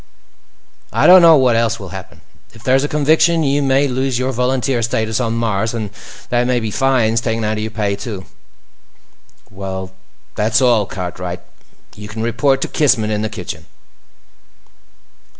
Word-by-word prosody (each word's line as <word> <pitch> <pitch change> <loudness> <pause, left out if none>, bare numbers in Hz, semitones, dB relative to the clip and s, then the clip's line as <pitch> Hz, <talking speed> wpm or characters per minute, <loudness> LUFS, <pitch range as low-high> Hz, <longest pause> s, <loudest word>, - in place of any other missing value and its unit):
"I - - +1
don't 185 0 +9
know 165 -2 +7
what 125 -3 +3
else 115 0 0
will 95 -3 -8
happen. 95 +1 -10 0.3
If 110 - -15
there's 130 +1 +2
a - - 0
conviction, 160 +3 +2
you 140 0 +1
may 135 +1 +2
lose 130 -1 -1
your 130 +1 -1
volunteer 125 0 0
status 110 -1 -1
on 115 -2 -1
Mars. 115 -1 -1
And 110 -3 -4 0.4
there 120 0 +2
may 125 0 +1
be 110 -2 -4
fines 120 -3 +1
taken 115 -1 -2
out 110 0 -1
of - - -3
your 110 +1 -3
pay, 105 -2 -2
too. 100 -3 -7 1.3
"Well, 95 -1 -6 0.4
that's 110 +2 +1
all, 120 -6 +3
Cartwright. 90 -1 -6 0.5
You 105 0 -9
can 110 +1 -5
report 135 +4 +1
to - - -1
Kissman 125 -8 +1
in 105 0 -1
the 110 - -2
kitchen." 110 - -8
115 Hz, 165 wpm, -17 LUFS, 105-130 Hz, 1.3 s, don't